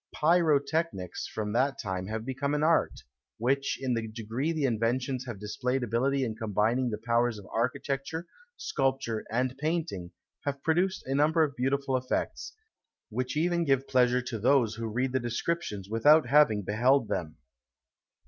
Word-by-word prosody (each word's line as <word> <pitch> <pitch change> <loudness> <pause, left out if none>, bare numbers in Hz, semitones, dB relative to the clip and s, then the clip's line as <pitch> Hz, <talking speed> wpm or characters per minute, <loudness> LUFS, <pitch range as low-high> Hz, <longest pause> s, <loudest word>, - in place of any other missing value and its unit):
Pyrotechnics 155 - +1
from 105 -1 -4
that 135 +4 +1
time 95 -2 -3
have 110 +1 -4
become 135 +3 -1
an 150 - 0
art, 165 +1 +2 0.3
which, 135 +4 0
in 130 -2 -1
the 115 -1 -2
degree 115 +7 -3
the 160 -3 -2
inventors 125 +2 -1
have 115 -5 -6
displayed 125 +5 -2
ability 130 +4 +1
in 110 -3 -2
combining 110 +4 0
the 105 - -3
powers 115 +1 +1
of 100 - -11
architecture, 135 +6 -2 0.3
sculpture, 135 -6 -1
and 125 +2 0
painting, 155 - -2 0.3
have 140 -1 -3
produced 180 +4 +1
a 135 - -2
number 155 +3 +3
of 140 -3 -2
beautiful 135 +1 0
effects, 130 0 -2 0.6
which 125 +5 -3
even 170 +2 +1
give 135 -3 +1
pleasure 125 -1 +3
to 120 -3 -4
those 120 -1 +3
who 115 +1 -4
read 125 +4 -1
the 130 - +1
descriptions 120 - -3
without 145 +8 +5
having 125 -7 +4
beheld 120 +5 +2
them. 80 -3 -3
130 Hz, 155 wpm, -29 LUFS, 115-140 Hz, 0.6 s, without